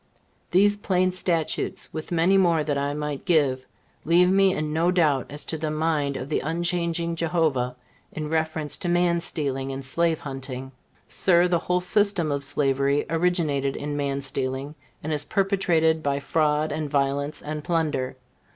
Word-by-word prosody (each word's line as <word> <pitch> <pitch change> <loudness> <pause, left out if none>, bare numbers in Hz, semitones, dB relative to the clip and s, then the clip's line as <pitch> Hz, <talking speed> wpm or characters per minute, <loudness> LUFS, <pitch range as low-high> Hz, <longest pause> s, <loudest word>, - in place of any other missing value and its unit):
These 205 +3 +4
plain 185 -2 +1
statutes, 175 -3 -2
with 155 +2 -6
many 175 +3 +3
more 170 -5 +3
that 150 -1 -1
I 140 +1 -1
might 150 -2 -4
give, 140 -7 +1 0.4
leave 180 +3 +4
me 195 0 +4
in 150 0 -2
no 165 +2 +2
doubt 155 -8 +2
as 145 +1 -6
to 160 - -3
the 155 0 -2
mind 155 -3 0
of 130 - -5
the 150 - 0
unchanging 170 +1 -1
Jehovah, 160 -7 0 0.4
in 155 -1 -5
reference 160 -1 -1
to 175 - -3
man 175 -1 +2
stealing 135 -4 -2
and 135 0 -6
slave 165 +3 0
hunting. 135 -1 -6 0.4
Sir, 175 -1 +3
the 175 -1 +1
whole 180 +1 0
system 180 -3 +2
of 140 0 -2
slavery 140 +1 +1
originated 160 -5 +1
in 145 0 -4
man 140 -1 -1
stealing, 135 +1 -3 0.3
and 155 +1 -2
is 150 -1 0
perpetuated 190 -6 +1
by 140 -2 0
fraud 150 +1 +1
and 155 -2 -3
violence 140 +1 0
and 150 0 -5
plunder. 155 -7 -1
155 Hz, 160 wpm, -25 LUFS, 140-170 Hz, 0.4 s, These